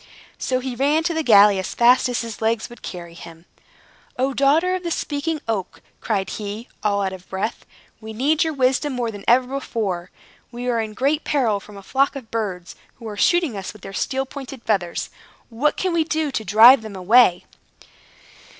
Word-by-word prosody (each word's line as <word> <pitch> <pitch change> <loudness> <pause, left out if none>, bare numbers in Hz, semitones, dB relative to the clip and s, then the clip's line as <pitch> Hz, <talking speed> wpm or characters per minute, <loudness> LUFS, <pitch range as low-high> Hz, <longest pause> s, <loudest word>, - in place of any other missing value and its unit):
So 255 0 -1
he 260 -1 -4
ran 290 +5 +1
to 340 - 0
the 320 - 0
galley 205 -6 +6
as 190 - -5
fast 245 +2 +4
as 245 - -1
his 230 -2 -7
legs 225 +1 -1
would 240 - -13
carry 170 -2 -8
him. 165 0 -13 0.7
"O, 265 +2 0
daughter 300 +8 +3
of 370 - -2
the 345 - -4
Speaking 310 0 -2
Oak," 200 -5 -3 0.2
cried 200 -4 -2
he, 210 +2 -6
all 200 -1 0
out 190 -1 -2
of 185 0 -12
breath, 195 +4 -4 0.3
"we 220 0 -9
need 280 +8 +1
your 320 -1 -2
wisdom 270 +1 +1
more 240 -2 -2
than 205 -2 -10
ever 250 +2 +5
before! 220 -9 -3 0.4
We 245 +1 -6
are 235 -2 +1
in 215 -1 -6
great 285 +6 0
peril 240 -9 +1
from 205 0 -14
a 195 - -11
flock 275 +7 +1
of 255 -5 -9
birds, 195 -6 -4 0.2
who 230 - -10
are 210 - -6
shooting 335 - +2
us 195 0 -6
with 215 - -17
their 195 - -8
steel 265 +6 -1
pointed 270 -2 -9
feathers. 185 -6 -1 0.4
What 265 +6 0
can 370 -2 -1
we 330 -1 +2
do 315 -2 -1
to 225 - -3
drive 225 +6 +7
them 215 -2 -9
away?" 190 0 +4
235 Hz, 195 wpm, -21 LUFS, 205-275 Hz, 0.7 s, drive